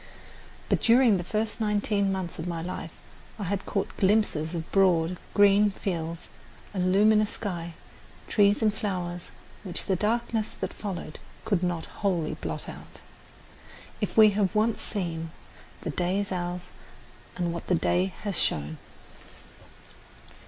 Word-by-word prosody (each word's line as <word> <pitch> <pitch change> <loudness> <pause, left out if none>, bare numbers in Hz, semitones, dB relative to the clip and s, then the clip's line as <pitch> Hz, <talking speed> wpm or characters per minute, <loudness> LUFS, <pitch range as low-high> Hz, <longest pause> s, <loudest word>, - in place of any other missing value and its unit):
But - - +1
during 235 -3 +5
the 175 - -3
first 215 +4 -2
nineteen 205 -1 +1
months 185 -4 -4
of 160 - -4
my 170 -2 -3
life 180 -2 -5 0.5
I 210 - -4
had 195 +1 -2
caught 200 - -2
glimpses 190 -5 +2
of 165 -1 -5
broad, 180 -3 +3 0.2
green 205 0 +6
fields, 170 -4 -4 0.4
a 195 - -3
luminous 210 +3 +4
sky, 170 -5 -5 0.5
trees 205 +1 +3
and 215 -1 +3
flowers 180 -5 -3 0.3
which 185 -4 -3
the 190 - +1
darkness 225 +2 0
that - - -3
followed 180 -6 -6 0.3
could 200 -5 +1
not 175 -3 -1 0.2
wholly 180 -6 +1
blot - - -5
out. - - -10 1.0
If - - -2
we 215 -1 +9
have 200 0 0
once 220 +1 +2
seen, 165 -5 -3 0.5
"the - - -3
day 180 +2 0
is 200 -1 -2
ours, 175 -1 -3 0.7
and 175 -2 -1
what 170 - -6
the 180 - +3
day 180 +3 +1
has 200 -4 0
shown." 75 +1 0
190 Hz, 140 wpm, -27 LUFS, 175-210 Hz, 1.0 s, we